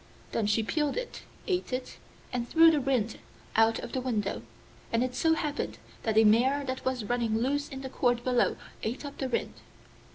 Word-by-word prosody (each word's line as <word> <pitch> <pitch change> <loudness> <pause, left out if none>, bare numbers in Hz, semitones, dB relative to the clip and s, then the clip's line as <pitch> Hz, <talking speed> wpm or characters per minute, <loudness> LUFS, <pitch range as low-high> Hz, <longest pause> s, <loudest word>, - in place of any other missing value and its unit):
Then 215 - 0
she 210 +2 +2
peeled 295 - 0
it, - - -5 0.2
ate 365 -7 -1
it, 255 0 -4 0.3
and 240 -1 -2
threw 330 0 +7
the 305 - +2
rind 250 -5 0 0.4
out 225 0 +4
of - - -6
the 260 - -1
window, 215 -6 -1 0.5
and 230 +1 +2
it 255 -1 -2
so 320 +5 +3
happened 300 -1 -3 0.2
that 220 -1 0
a 220 - +8
mare 250 +7 +4
that 260 0 -4
was 255 -4 -1
running 235 -1 0
loose 280 +5 0
in 270 -1 -7
the 265 - -5
court 245 -2 +1
below 250 -1 +2 0.2
ate 240 +6 -3
up 285 - -8
the 265 - -1
rind. 240 - -1
255 Hz, 195 wpm, -29 LUFS, 230-280 Hz, 0.5 s, a